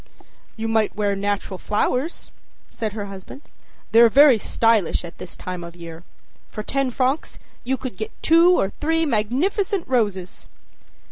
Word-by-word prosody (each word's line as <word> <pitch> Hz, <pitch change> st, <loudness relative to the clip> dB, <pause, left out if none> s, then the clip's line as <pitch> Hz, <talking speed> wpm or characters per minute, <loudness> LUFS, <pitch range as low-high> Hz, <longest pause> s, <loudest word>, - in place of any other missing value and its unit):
â 220 Hz, -, -4 dB
âYou -, -, 0 dB
might 220 Hz, -1 st, +1 dB
wear 205 Hz, -1 st, 0 dB
natural 200 Hz, -1 st, -3 dB
flowers,â 250 Hz, +9 st, -2 dB, 0.4 s
said 220 Hz, -3 st, -3 dB
her 210 Hz, -2 st, -4 dB
husband. 195 Hz, +8 st, -10 dB, 0.5 s
âThey're 230 Hz, +1 st, +7 dB
very 275 Hz, -1 st, +6 dB
stylish 220 Hz, -6 st, +1 dB
at 170 Hz, -, -12 dB
this 180 Hz, -, -9 dB
time 180 Hz, -1 st, -6 dB
of 170 Hz, 0 st, -10 dB
year. 165 Hz, -1 st, -10 dB, 0.5 s
For 215 Hz, -, -6 dB
ten 275 Hz, +3 st, -1 dB
francs 260 Hz, +4 st, -1 dB, 0.3 s
you 265 Hz, +2 st, -1 dB
can 255 Hz, -2 st, -6 dB
get 440 Hz, -, -5 dB
two 335 Hz, +2 st, +6 dB
or 195 Hz, -, 0 dB
three 325 Hz, +2 st, +1 dB
magnificent 320 Hz, -, 0 dB
roses. 205 Hz, -8 st, -2 dB
225 Hz, 150 wpm, -22 LUFS, 200-275 Hz, 0.5 s, âThey're